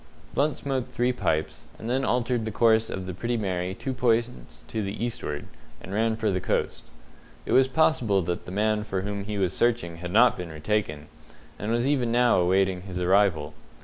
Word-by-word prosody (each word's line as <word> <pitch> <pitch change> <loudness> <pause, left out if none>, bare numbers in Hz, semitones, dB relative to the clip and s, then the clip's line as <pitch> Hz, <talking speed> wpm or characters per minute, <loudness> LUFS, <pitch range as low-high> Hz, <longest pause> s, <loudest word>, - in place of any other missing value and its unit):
Blunt 145 +1 +1
smoked 135 -3 -3
three 125 +1 +2
pipes, 80 -9 -2
and 110 - -7
then 130 +3 0
altered 125 -2 0
the 110 - -3
course 110 0 +3
of 95 - -4
the 90 - -5
Pretty 120 +6 -2
Mary 95 -3 -2
two 135 - -4
points 115 - -1
to 110 - -3
the 100 +3 -3
eastward, 75 -11 -4 0.3
and 95 +5 -9
ran 110 +1 +1
for 110 -2 0
the 90 -1 -1
coast. - - -2 0.6
It - - -4
was 130 0 +5
possible 125 - +2
that 85 +1 -4
the - - -6
man 105 +2 +1
for 95 -3 -3
whom 100 0 -4
he 105 0 -4
was 95 -3 0
searching 115 -9 0
had 90 +1 -6
not - - +5
been 90 -2 -6
retaken, 80 -2 -2 0.5
and 105 +2 -2
was 120 +2 +1
even 130 -5 +1
now 120 -2 +4
awaiting 95 +1 +2
his 90 -1 -6
arrival. 90 -5 +2
105 Hz, 195 wpm, -26 LUFS, 90-120 Hz, 0.6 s, was